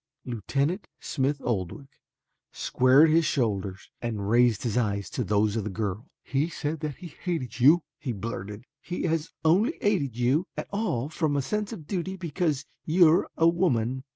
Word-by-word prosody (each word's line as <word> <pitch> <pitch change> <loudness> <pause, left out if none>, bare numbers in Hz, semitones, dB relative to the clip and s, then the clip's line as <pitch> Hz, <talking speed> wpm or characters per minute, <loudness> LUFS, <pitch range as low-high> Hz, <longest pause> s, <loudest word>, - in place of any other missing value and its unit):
Lieutenant 140 - -1
Smith 140 0 -1
Oldwick 115 +5 -3 0.6
squared 135 +5 +4
his 165 +1 +4
shoulders 100 -9 -1
and 110 -4 -3
raised 120 0 +3
his 115 -4 -1
eyes 100 -5 0
to 125 - -1
those 105 +1 +1
of 110 - -1
the 105 - -3
girl. 105 +1 -3 0.2
"He 140 +4 0
said 155 -1 -3
that 150 -2 -4
he 180 - -9
hated 135 - -4
you," 155 +7 +6 0.2
he 145 -5 -3
blurted. 105 0 -6 0.2
"He 175 - -4
has 165 -2 0 0.2
only 205 - +3
aided 145 - 0
you 135 +9 +2
at - - -3
all 175 - -1
from 155 -2 0
a 140 - +2
sense 210 - -2
of 170 -9 -8
duty 190 +2 -3
because 155 -4 -1 0.2
you 170 +2 +5
are 165 - +2
a 165 - +5
woman." 130 -8 +1
140 Hz, 170 wpm, -27 LUFS, 115-165 Hz, 0.6 s, you